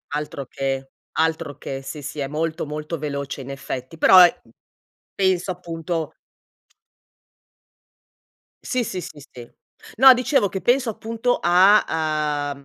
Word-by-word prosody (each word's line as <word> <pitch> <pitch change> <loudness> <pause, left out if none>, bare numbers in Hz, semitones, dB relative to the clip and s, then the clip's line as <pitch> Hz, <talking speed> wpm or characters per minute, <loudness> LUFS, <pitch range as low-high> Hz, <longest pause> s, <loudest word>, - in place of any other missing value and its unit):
Altro 145 -2 -4
che, 135 0 -3 0.2
altro 160 -3 -1
che. 135 0 -6
Sì, 145 +2 -8
sì, 145 - -7
è 140 - -2
molto, 155 +2 -3
molto 150 +2 -5
veloce, 140 -2 -5
in 130 - -9
effetti, 135 +2 -7
però 185 - +7
è 175 -1 +5 0.8
penso 190 -1 +1
appunto 165 -2 -5 2.5
Sì, 250 -2 -1
sì, 185 - -4
sì, 155 - -10
sì. 120 -1 -11 0.5
No, 265 +2 +9
dicevo 250 -4 +1
che 190 - -5
penso, 250 0 +2
appunto, 230 +3 -2
a 185 +4 +5 0.7
uhm, 140 - -17
165 Hz, 130 wpm, -22 LUFS, 140-190 Hz, 2.5 s, No